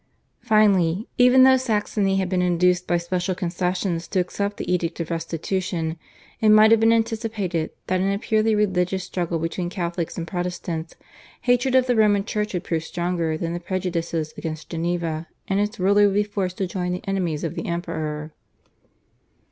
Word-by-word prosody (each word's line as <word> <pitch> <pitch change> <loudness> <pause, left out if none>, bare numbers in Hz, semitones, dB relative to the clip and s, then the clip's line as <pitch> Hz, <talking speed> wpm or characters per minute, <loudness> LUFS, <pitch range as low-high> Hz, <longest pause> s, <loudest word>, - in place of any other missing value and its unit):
Finally, 205 -4 +3
even 250 +1 +7
though 260 0 +7
Saxony 210 -5 0
had 190 -1 0
been 180 0 0
induced 180 0 +2
by 175 - +2
special 180 +2 -2
concessions 180 -1 -2
to 185 - 0
accept 200 +3 -2
the - - -2
Edict 170 -1 -1
of 165 0 -4
Restitution, 165 0 -2 0.4
it 215 - +3
might 215 +1 +7
have 225 - +6
been 225 +1 +4
anticipated 220 -7 -1 0.2
that 185 0 0
in 195 +1 +1
a 200 - 0
purely 220 +1 +1
religious 190 -2 +1
struggle 175 -2 -2
between 165 +2 -3
Catholics 175 -2 -3
and 170 - -3
Protestants 175 -2 -4 0.5
hatred 245 +1 +2
of 260 -1 +5
the 250 -1 +1
Roman 205 -2 +3
Church 210 -3 -2
would 175 - -2
prove 160 -2 -2
stronger 170 -2 -2
than 165 +1 -3
the 175 - -3
prejudices 170 -3 -3
against 155 -2 -6
Geneva, 165 -1 -2 0.2
and 195 0 +1
its 210 +2 -1
ruler 200 +2 +4
would 195 - -1
be 205 - +3
forced 195 -3 -3
to 195 - 0
join 180 0 -3
the 180 +4 -6
enemies 180 -6 -1
of 165 - -2
the - - -5
Emperor. 155 -3 -4
180 Hz, 175 wpm, -23 LUFS, 170-205 Hz, 0.5 s, even